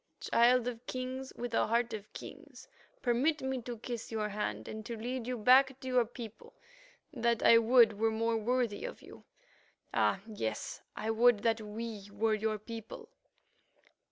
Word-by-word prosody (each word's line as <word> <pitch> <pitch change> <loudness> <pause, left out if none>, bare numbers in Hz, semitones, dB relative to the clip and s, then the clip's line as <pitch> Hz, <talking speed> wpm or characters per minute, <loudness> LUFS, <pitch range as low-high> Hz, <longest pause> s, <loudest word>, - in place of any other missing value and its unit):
"Child 245 +1 +3
of 240 -1 -6
Kings 260 +1 -4
with 240 0 -5
a - - +2
heart 235 +2 +1
of 210 -1 -7
kings, - - -11 0.4
permit 265 +5 +1
me 265 -1 -2
to 240 0 -6
kiss 235 0 -6
your 215 -1 -1
hand 110 - -3
and 220 0 -6
to 235 - -5
lead 245 +2 -4
you 250 -1 -2
back 260 +4 +5
to 260 - -8
your 250 -2 +3
people, 230 -2 -10 0.6
that 235 -3 +1
I 230 - +8
would 230 -2 +5
were 225 0 +3
more 225 +1 0
worthy 235 - 0
of - - -7
you. - - -14 0.7
Ah! 195 - +2
yes, 110 - -4
I 220 +1 -2
would 225 -1 +4
that 225 -1 +2
we 210 -1 -6
were 215 +2 +1
your 215 0 0
people." 230 - -9
230 Hz, 165 wpm, -32 LUFS, 220-250 Hz, 0.7 s, I